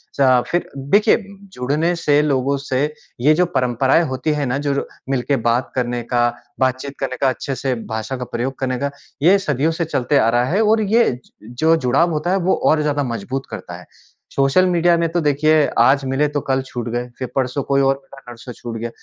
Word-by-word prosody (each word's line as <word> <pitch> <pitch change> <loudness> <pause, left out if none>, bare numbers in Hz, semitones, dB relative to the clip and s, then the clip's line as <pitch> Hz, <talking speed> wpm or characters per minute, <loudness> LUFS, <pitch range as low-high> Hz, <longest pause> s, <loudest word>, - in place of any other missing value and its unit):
चा 130 -3 +4
फिर 175 - -1
देखिए 145 +11 +3 0.4
जुड़ने 150 +7 0
से 150 -3 +2
लोगों 140 -1 +1
से 135 -1 -1 0.4
ये 150 +5 +5
जो 180 +3 +3
परंपराएँ 130 +4 +2
होती 130 +4 -1
हैं 145 -1 -1
ना 125 +2 -1
जो 140 - +2
र - - -1 0.2
मिलके 135 +1 0
बात 120 +2 +1
करने 120 -1 -1
का, 120 0 +1 0.3
बातचीत 130 +2 -1
करने 130 -1 -3
का, 135 - +4
अच्छे 135 +2 -4
से 130 0 -1 0.2
भाषा 110 +4 -4
का 125 - -5
प्रयोग 125 +3 -4
करने 130 -1 -1
का 140 0 -2 0.3
ये 185 +5 +6
सदियों 150 -4 0
से 165 +1 -2
चलते 145 -2 0
आ 115 - +4
रहा 120 +1 +2
है 200 +5 +2
और 220 +1 +3
ये 220 +3 +3
ज - - -26 0.3
जो 160 +1 +5
जुड़ाव 140 +5 +2
होता 155 +3 -1
है 190 - +2
वो 185 0 +1 0.2
और 155 -1 +2
ज़्यादा 145 -1 0
मज़बूत 125 +2 -4
करता 85 - -7
है। 90 - -14 0.5
सोशल 135 +7 +3
मीडिया 175 0 +3
में 170 0 +1
तो 175 - 0
देखिए 150 +1 +3
आज 135 +4 +4
मिले 135 +3 +1
तो 145 0 -2
कल 135 0 0
छूट 120 -2 -6
गए 120 +1 -3
फिर 130 - -3
परसों 130 +1 0
कोई 140 +1 +1
और 135 0 +3
मिला 135 0 -14
नरसों 120 +1 -10
छूट 120 0 -8
गया। 120 +1 -4
135 Hz, 215 wpm, -19 LUFS, 125-155 Hz, 0.5 s, ये